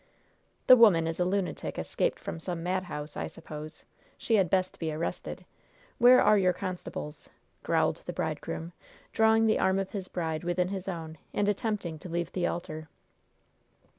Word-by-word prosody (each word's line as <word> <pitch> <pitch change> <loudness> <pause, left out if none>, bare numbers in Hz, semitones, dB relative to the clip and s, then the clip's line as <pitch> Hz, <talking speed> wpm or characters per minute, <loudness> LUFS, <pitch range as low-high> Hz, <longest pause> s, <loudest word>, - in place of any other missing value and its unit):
"The 255 - +10
woman 205 -9 +6
is 165 +1 -3
a 180 - +3
lunatic 190 0 -2
escaped - - -1
from - - -6
some 165 0 -4
madhouse, 180 -5 -3
I - - -3
suppose. 155 -1 -9 0.3
She 230 - -2
had 190 -4 +3
best 185 0 0
be 160 -2 -2
arrested. 155 +2 -4 0.5
Where 250 +1 +8
are 210 - +5
your 185 -1 +3
constables?" 175 -5 -6 0.3
growled - - +1
the - - -3
bridegroom, 165 +2 -4 0.4
drawing 220 0 +4
the 220 - +3
arm 190 0 +3
of 195 -1 -2
his 195 -3 -5
bride 160 -2 -3
within 175 +1 0
his 195 -1 -5
own 160 -4 -5 0.2
and 205 - +1
attempting 205 -6 -1
to 180 - -9
leave 170 0 -2
the 180 -2 0
altar. 155 -2 -5
180 Hz, 165 wpm, -29 LUFS, 165-195 Hz, 0.5 s, The